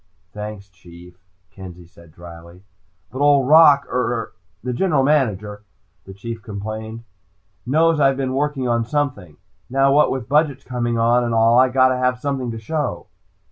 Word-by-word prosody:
"Thanks, 105 -1 -8
Chief," 90 -1 -17 0.3
Kenzie 90 -2 -12
said 85 -1 -19
drily. 85 +2 -14 0.5
"But 130 - -7
Old 145 -3 +3
Rock 145 -2 +6
er 120 -2 -3 0.3
the 125 0 -3
General 150 -1 +1
Manager," 105 -8 0 0.4
the 95 - -11
Chief 115 +3 -7
complained, 110 +2 -7 0.6
"knows 160 +3 +2
I've 135 -2 +3
been 130 -1 -2
working 140 -1 -2
on 115 -1 0
something. 120 - -3 0.3
Now 135 +1 +2
what 150 +1 +4
with 130 -3 -4
budgets 145 -1 +1
coming 120 -2 -3
on, 120 +2 +2
and 120 -1 -2
all, 115 +2 +4
I 130 0 +4
gotta 130 0 +2
have 125 0 0
something 135 -2 -3
to 115 - -6
show!" 150 +7 -4
120 Hz, 155 wpm, -20 LUFS, 105-135 Hz, 0.6 s, Rock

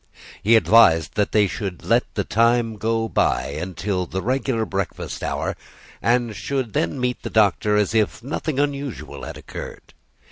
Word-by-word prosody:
He 115 +3 +5
advised 85 -9 +5
that 105 - 0
they 105 -1 +4
should 95 -3 -5
let - - +2
the - - 0
time 115 0 +2
go 115 +2 0
by 65 - +1
until 90 +4 -3
the 95 +2 -4
regular 130 -2 0
breakfast 100 -3 -4
hour, - - -2 0.5
and 120 -2 +1
should 130 -4 -3
then 85 +8 -1
meet 125 0 -1
the - - -5
Doctor 105 0 +3
as 105 0 +1
if 110 0 +1
nothing 145 +1 -3
unusual 140 -2 -3
had - - -7
occurred. - - -9
110 Hz, 155 wpm, -22 LUFS, 95-120 Hz, 0.5 s, He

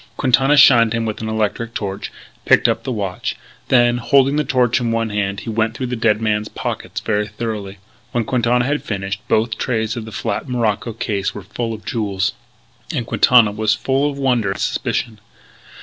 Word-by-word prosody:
Quintana 135 +2 +3
shined 120 -5 +7
him 115 -1 -1
with 110 -1 -4
an 110 - -3
electric 110 +1 -2
torch; 100 -2 -4 0.3
picked - - +4
up - - 0
the 130 - -3
watch. 100 -6 -3 0.3
Then, 120 -1 +4
holding 135 +2 +3
the 150 - +2
torch 125 -3 +2
in 115 -1 0
one 115 -1 -1
hand, 100 -1 -2
he - - -7
went 110 0 0
through 130 - -3
the 125 0 -3
dead 110 -2 +2
man's 105 -1 0
pockets - - -5
very 105 -1 0
thoroughly. 105 -2 -5 0.3
When 120 -1 0
Quintana 120 0 +1
had 145 +2 0
finished, 95 -1 -4
both 110 0 +1
trays 110 -3 -1
of 115 -2 -5
the 110 - -9
flat 130 - -3
morocco 115 -2 -1
case 100 -3 -2
were 100 - -7
full 115 +4 -4
of 110 -1 -8
jewels. 100 -3 -1 0.6
And 130 -8 -2
Quintana 120 -2 +5
was 110 +1 +1
full 135 +5 0
of 140 - -6
wonder 125 -7 +1
and 100 +1 -3
suspicion. 110 -2 -2
115 Hz, 190 wpm, -19 LUFS, 105-125 Hz, 0.6 s, shined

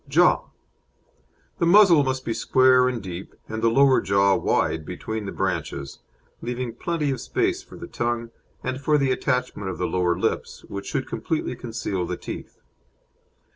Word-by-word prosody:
JAW 175 +5 +4 1.1
The 170 - +2
muzzle 175 -5 +7
must 130 -1 -2
be 115 - -1
square 130 +2 +4
and 120 -4 -4
deep, 90 0 -7
and 110 0 -4
the 115 - +4
lower 135 +2 +5
jaw 100 0 +3
wide 80 - 0
between 105 +5 -5
the - - -4
branches, 70 -1 -3 0.4
leaving 120 0 -3
plenty 155 0 -1
of 130 -3 -3
space 370 - 0
for 390 - -14
the 355 - -8
tongue, 120 - -2 0.3
and 130 +1 -3
for 150 +1 +3
the 135 -2 +2
attachment 125 -7 -1
of 95 - -5
the 90 - -1
lower 90 -1 +1
lips, - - -2
which 100 0 -6
should 130 - -2
completely 160 -5 -2
conceal 110 -7 -3
the 90 - -3
teeth. - - -8
125 Hz, 165 wpm, -24 LUFS, 100-140 Hz, 1.1 s, muzzle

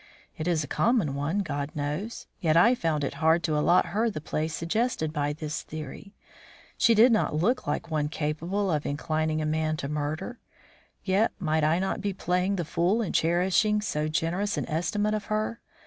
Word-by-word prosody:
It 155 - -4
is 165 -3 +1
a - - -6
common 215 - +1
one, 145 +8 -1
God 145 -3 -3
knows. 150 +10 -4
Yet 160 -2 +2
I 230 +9 +6
found 160 -10 -1
it 140 - -2
hard 160 +1 +4
to 155 -1 0
allot 160 +4 +4
her 225 +3 +2
the 175 - -5
place 155 +1 -2
suggested 170 -2 -1
by 145 -1 0
this 155 0 -4
theory. 155 +6 -8 0.6
She 230 - +4
did 235 +4 +7
not 220 -8 +2
look 235 +11 +1
like 170 - -2
one 150 -1 0
capable 170 +6 -1
of 150 -2 0
inclining 155 +1 -1
a - - -1
man 155 0 0
to 140 - -4
murder. 150 - -3 0.6
Yet 200 +4 +2
might 160 -4 0
I 155 +2 +3
not 190 +2 -1
be 200 -1 -1
playing 180 +1 0
the 175 -3 -2
fool 180 +8 +1
in 200 - -4
cherishing 185 +5 +2
so 155 -7 -2
generous 165 +6 -1
an - - -2
estimate 205 +7 0
of 210 -1 -2
her? 215 +2 -2
165 Hz, 190 wpm, -27 LUFS, 155-205 Hz, 0.6 s, did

